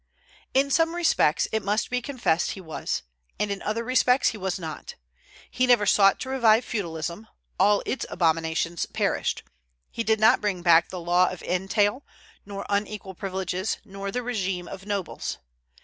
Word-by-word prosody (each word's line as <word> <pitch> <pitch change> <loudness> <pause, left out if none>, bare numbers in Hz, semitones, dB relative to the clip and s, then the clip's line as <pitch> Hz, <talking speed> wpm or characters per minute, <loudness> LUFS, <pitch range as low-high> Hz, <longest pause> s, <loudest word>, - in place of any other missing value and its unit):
In 275 +1 +3
some 330 +3 +2
respects, 320 - +2
it 220 - 0
must 210 +4 0
be 250 0 0
confessed, 235 - 0
he - - -9
was, 160 -4 -4 0.4
and 210 -1 0
in 200 - -4
other 225 +2 -2
respects 255 +1 +3
he 220 - -6
was 190 -1 -2
not. 160 -4 -7 0.6
He 255 0 +1
never 240 -4 +5
sought 195 -1 +5
to 260 - -4
revive 235 -3 +4
feudalism; 170 0 -4 0.3
all 205 +2 +4
its 265 - -3
abominations 165 0 0
perished. - - -1 0.5
He 230 - -3
did 220 -1 +2
not 220 +1 +5
bring 195 -4 -2
back 170 -1 +5
the 185 - -6
law 175 +1 +3
of 185 - -8
entail, 205 +7 0 0.4
nor 200 -1 -6
unequal 200 -1 -2
privileges, 190 +1 -3
nor 195 -1 -6
the 250 +5 -2
régime 195 -7 -2
of 195 +1 -9
nobles. 200 -4 -3
200 Hz, 165 wpm, -25 LUFS, 180-230 Hz, 0.6 s, never